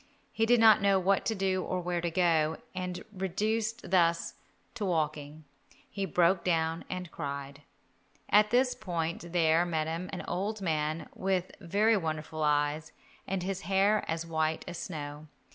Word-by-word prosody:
He 225 0 +1
did 240 0 +5
not 220 -3 +7
know 200 -1 +4
what 190 +1 +1
to 225 - 0
do 190 -1 0
or 185 - -2
where 175 -1 -2
to 170 - -1
go, 160 -3 +2 0.2
and 180 -1 -4
reduced 215 +4 -2
thus 170 -2 +2 0.4
to 240 - -5
walking, 155 -4 -2 0.5
he 195 -1 -2
broke 175 +2 +3
down 165 -1 0
and 180 -2 -5
cried. 140 -1 -6 0.7
At 210 +1 +5
this 250 +2 +3
point 170 -3 -4
there 165 -1 +3
met 160 -3 -1
him 165 +3 -4
an 185 - -5
old 205 +5 -2
man 155 -3 -1
with 185 -1 -1
very 205 +4 +2
wonderful 155 -2 -4
eyes, 150 +1 +1 0.4
and 190 -1 -2
hair 195 +2 +1
as 165 +1 -2
white 160 -1 -1
as 175 -1 -6
snow. 150 -3 -6
175 Hz, 155 wpm, -30 LUFS, 160-195 Hz, 0.7 s, not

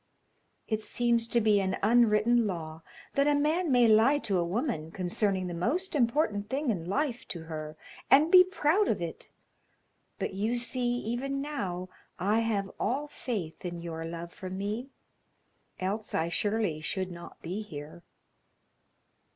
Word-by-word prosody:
It 215 -1 -1
seems 235 0 +1
to 235 - +2
be 210 -2 +4
an 190 -1 -1
unwritten 230 +1 +4
law 160 -4 -5 0.3
that 280 +1 +3
a 295 - +4
man 310 +3 +1
may 245 -2 +6
lie 225 +6 +5
to 210 -9 0
a - - +2
woman 185 - -2
concerning 185 +2 -1
the 175 - -4
most 295 - -1
important 235 -6 +1
thing 275 -1 0
in 175 -4 -4
life 255 +2 -1
to 170 -2 -6
her, 155 -1 -6 0.3
and 300 +5 +6
be 365 -1 +10
proud 370 +1 +2
of - - +1
it, - - -5 0.9
but - - -3
you 215 +5 0
see 240 0 0
even 250 +4 -2
now 195 -12 -3 0.3
I 210 +4 +2
have 210 -4 -1
all 270 +7 -1
faith 205 - -5
in 175 -1 -4
your 165 -1 -5
love 170 +1 -6
for 185 - -7
me, 205 +7 -3 0.9
else 205 +4 -3
I 160 +1 +1
surely 205 -3 0
should 185 +3 -2
not 170 0 -10
be 185 +6 -3
here. 155 -4 -9
215 Hz, 155 wpm, -29 LUFS, 180-245 Hz, 0.9 s, be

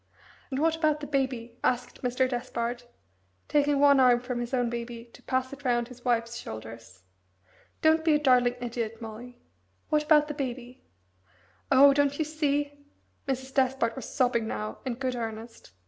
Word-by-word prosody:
"And 265 - -3
what 320 +1 +2
about 310 -2 +1
the 295 - -6
Baby?" 255 -4 -2
asked 250 0 -1
Mr. 250 +1 +1
Despard, 240 -1 -3 0.6
taking 290 -1 +2
one 285 -1 +6
arm 250 -2 +5
from 250 0 -4
his 240 +1 -4
own 250 -2 +1
baby 235 0 -5
to - - -15
pass 260 0 -2
it 280 +1 -11
round 240 -2 +1
his 250 -1 -13
wife's 235 -1 0
shoulders. 110 -3 -9 0.8
"Don't 315 0 +4
be 315 -2 +4
a - - +2
darling 250 -4 +4
idiot, 230 -2 -4
Molly. 235 +2 -9 0.5
What 305 -1 +3
about 300 -1 +4
the 300 - -4
Baby?" 255 -2 -5 0.9
"Oh 275 +1 +8
don't 285 0 +1
you 315 - 0
see?" 290 -1 -1 0.4
Mrs. 265 0 -3
Despard 260 -3 +1
was 265 - -7
sobbing 245 -4 +1
now 215 -1 -4
in 245 - -1
good 255 0 -2
earnest. 225 - -7
255 Hz, 165 wpm, -28 LUFS, 235-285 Hz, 0.9 s, Oh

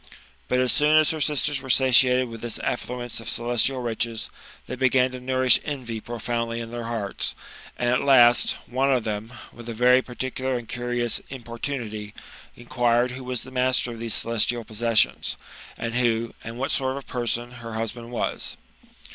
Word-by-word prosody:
Bilt 125 0 +2
as 130 - +3
soon 150 +1 +4
as 155 -1 +4
her 160 -1 -4
sisters 145 -1 +1
were 130 - -10
satiated 130 0 +5
with 115 -1 -9
this 120 -2 -3
affluence 120 -1 -3
of 115 0 -5
celes 120 0 +1
tial 130 -2 +1
riches, 115 -1 -2 0.3
they - - -7
began 130 0 +3
to 130 - -7
nourish 130 -1 +4
envy 125 -6 -4
profoundly 115 +1 -3
in 115 0 -6
their 120 -1 -5
hearts; 110 -4 -3 0.4
and, 120 - -1
at 125 +1 +2
last, 120 -3 +6
one 135 +3 +1
of 125 -3 +2
them, 110 +1 -4 0.2
with 120 0 -10
a 115 - -5
very 125 +2 +5
particular 130 +1 -3
and 120 -2 -8
curious 120 -1 -1
importunity, 115 -4 -5 0.4
inquired 120 0 +1
who 130 +1 -7
was 125 -2 -3
the 130 - -11
master 125 -1 +1
of 115 - -8
these 115 -1 0
celestial 115 +1 +1
possessions? 115 +1 +1 0.4
And 115 0 -4
who, 115 -2 +1
and 115 +1 -7
what 135 +2 -1
sort 130 -1 0
of 140 - -7
a - - -31
person, 120 0 -2
her 115 -1 -7
husband 115 +1 -4
was 120 - -3
120 Hz, 180 wpm, -25 LUFS, 115-130 Hz, 0.4 s, last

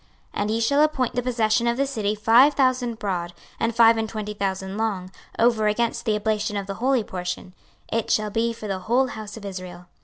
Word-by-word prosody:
26:045:006 - - -2
And 205 - 0
ye 225 - 0
shall 280 +6 +3
appoint 295 -6 +1
the 245 - 0
possession 235 -1 +1
of 235 0 +1
the 275 - +2
city 215 -6 -1
five 235 +7 +5
thousand 255 -3 +1
broad, 180 -5 -3 0.3
and 230 0 0
five 230 -1 +6
and 220 -1 -2
twenty 210 -1 -5
thousand 190 -1 -3
long, 200 -4 -2 0.3
over 225 -2 +3
against 230 +2 0
the 215 - +2
oblation 210 0 -1
of 200 - -3
the 195 - -4
holy 260 -2 +2
portion: 180 -1 -5 0.4
it 230 0 -1
shall 215 -1 +1
be 230 +2 0
for 225 -2 -7
the 195 -2 -2
whole 245 +7 +1
house 215 -1 -8
of 210 - -9
Israel. 185 -2 -7
220 Hz, 215 wpm, -24 LUFS, 200-235 Hz, 0.4 s, five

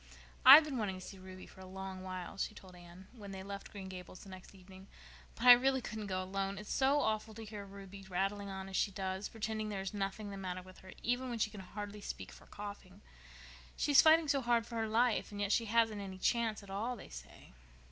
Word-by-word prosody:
"I've 280 +5 +12
been 285 -5 -3
wanting 200 -3 -1
to 185 - -9
go - - -8
to - - -8
see 195 - -11
Ruby 185 0 -10
for 190 - -15
a 185 - -10
long 190 0 -7
while," 185 0 -6
she 215 +2 -3
told 185 -3 -13
Anne, 175 +2 -13
when 205 -4 -10
they 190 -1 -7
left 200 0 -7
Green 195 -3 -7
Gables 185 -1 -9
the 195 - -12
next 185 +1 -12
evening, 190 +1 -14 0.5
"but 235 - -4
I 250 - +12
really 265 +2 +6
couldn't 220 -3 -6
go 185 -1 -1
alone. 195 +1 -3
It's 210 +1 -5
so 275 +2 +3
awful 220 0 -1
to 225 0 -8
hear 210 -1 -7
Ruby 195 0 -10
rattling 195 +2 -1
on 190 0 -6
as 190 - -7
she 205 - +2
does, 190 0 -3
and - - -18
pretending 215 -1 -3
there 200 -2 -3
is 195 +2 -4
nothing 200 +1 -3
the 195 - -6
matter 185 -1 -5
with 185 0 -14
her, 190 - -12
even 245 +2 0
when 240 - -3
she 215 -1 0
can 205 -2 -8
hardly 205 +2 -7
speak 95 - -6
for - - -15
coughing. 200 -1 -9 0.8
She's 290 -2 +6
fighting 320 0 +6
so 280 -1 +2
hard 235 -2 +2
for 235 - -12
her 225 0 0
life, 230 +1 +2
and 205 - -7
yet 205 -1 0
she 230 - +3
hasn't 225 -1 +2
any 190 -1 -7
chance 225 +1 0
at 195 - -11
all, 225 +6 -2
they - - -11
say." - - -12
200 Hz, 250 wpm, -35 LUFS, 190-225 Hz, 0.8 s, I've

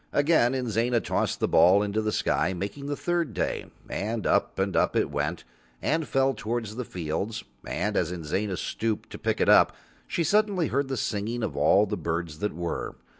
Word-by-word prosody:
Again 145 -4 +4
Inzana 120 -1 +1
tossed - - -1
the - - +1
ball 95 +4 +5
into 105 +1 -1
the 110 0 -1
sky, 95 -2 +1
making 100 +10 -5
the 145 - -1
third 170 -7 -1
day, - - -2 0.2
and 110 +2 -3
up - - +1
and 95 -1 0
up - - +2
it - - +1
went 80 +4 -2 0.4
and 160 0 0
fell 135 0 +2
towards 110 -1 -3
the 125 - -3
fields, 90 +4 -3 0.2
and 105 +6 -1
as 90 -1 +1
Inzana 90 +3 -2
stooped 110 -2 -3
to - - -8
pick - - -1
it - - +2
up - - +6 0.3
she 170 -1 0
suddenly 200 -1 +2
heard 140 +1 0
the 135 -1 -3
singing 110 +3 -2
of 110 - -2
all 100 +2 +4
the 105 0 -3
birds 85 -2 -3
that 105 - -2
were. 85 -1 -3
110 Hz, 190 wpm, -27 LUFS, 95-135 Hz, 0.4 s, up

